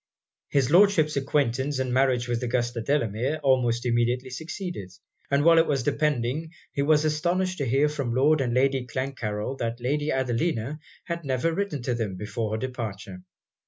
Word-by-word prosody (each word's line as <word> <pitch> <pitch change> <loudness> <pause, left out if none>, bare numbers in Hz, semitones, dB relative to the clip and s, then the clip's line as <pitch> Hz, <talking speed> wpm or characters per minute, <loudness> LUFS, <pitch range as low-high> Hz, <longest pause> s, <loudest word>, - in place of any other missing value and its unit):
His 140 -1 +1
Lordship's 175 -4 +5
acquaintance 135 -1 0
and 130 -1 -1
marriage 130 -2 +2
with 120 0 -1
Augusta 120 -1 -1
Delamere, 125 +3 0
almost 125 -3 +2
immediately 120 +2 0
succeeded; 160 - -6 0.4
but 140 +1 +2
while 165 +1 +6
it 165 - +3
was 135 -4 0
depending, 150 +3 -1 0.2
he 140 - 0
was 150 +1 +3
astonished 175 +4 0
to 140 - -1
hear 135 +5 +3
from 140 -6 -2
Lord 145 +3 +4
and 125 -3 0
Lady 130 0 +1
Clancarryl 130 -2 -3
that 115 +1 -2
Lady 145 +5 -1
Adelina 130 +1 -1 0.2
had 170 -1 -4
never 140 +4 0
written 175 -8 -2
to 125 - 0
them 110 -5 -2
before 105 +2 -3
her - - 0
departure. 110 -7 -5
130 Hz, 160 wpm, -26 LUFS, 120-150 Hz, 0.4 s, while